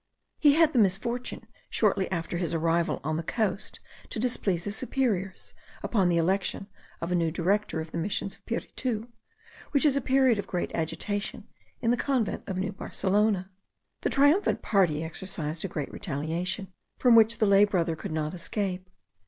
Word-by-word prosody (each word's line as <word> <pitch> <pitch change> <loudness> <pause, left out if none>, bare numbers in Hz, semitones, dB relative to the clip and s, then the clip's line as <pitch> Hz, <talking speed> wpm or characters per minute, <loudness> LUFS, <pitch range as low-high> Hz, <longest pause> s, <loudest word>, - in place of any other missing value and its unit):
He 290 -2 +6
had 320 -1 +4
the 250 - +3
misfortune 225 +5 0 0.2
shortly 195 -3 +1
after 170 -1 -2
his 170 -2 -1
arrival 165 +1 +1
on 155 +2 -1
the - - -1
coast 210 +2 -2 0.3
to - - -3
displease 200 -7 +1
his 205 +1 -2
superiors, 220 -7 -1 0.3
upon 195 -6 +2
the 170 - +2
election 190 +3 0 0.4
of 170 +2 -3
a - - +2
new 165 -2 +2
director 180 +2 0
of 160 0 -8
the - - -3
Missions 195 +2 -1
of - - -13
Piritu, 235 -1 -3 0.6
which 280 0 +3
is 285 -3 +5
a 280 - +1
period 260 -3 +3
of 200 - -4
great 180 - -3
agitation 200 +5 -3 0.3
in 230 -1 +2
the 245 - +2
convent 255 -4 0
of 190 - -3
New 190 +2 -1
Barcelona. 195 0 0 0.5
The - - 0
triumphant 290 +8 +3
party 175 -7 +2
exercised 160 -2 -4
a - - -1
general 150 -5 -3
retaliation, 170 +6 -3 0.2
from 250 -2 +5
which 225 0 +6
the 225 - +3
lay 200 0 +6
brother 175 -5 +1
could - - -6
not 155 0 -2
escape. 185 +1 -3
195 Hz, 170 wpm, -28 LUFS, 170-225 Hz, 0.6 s, He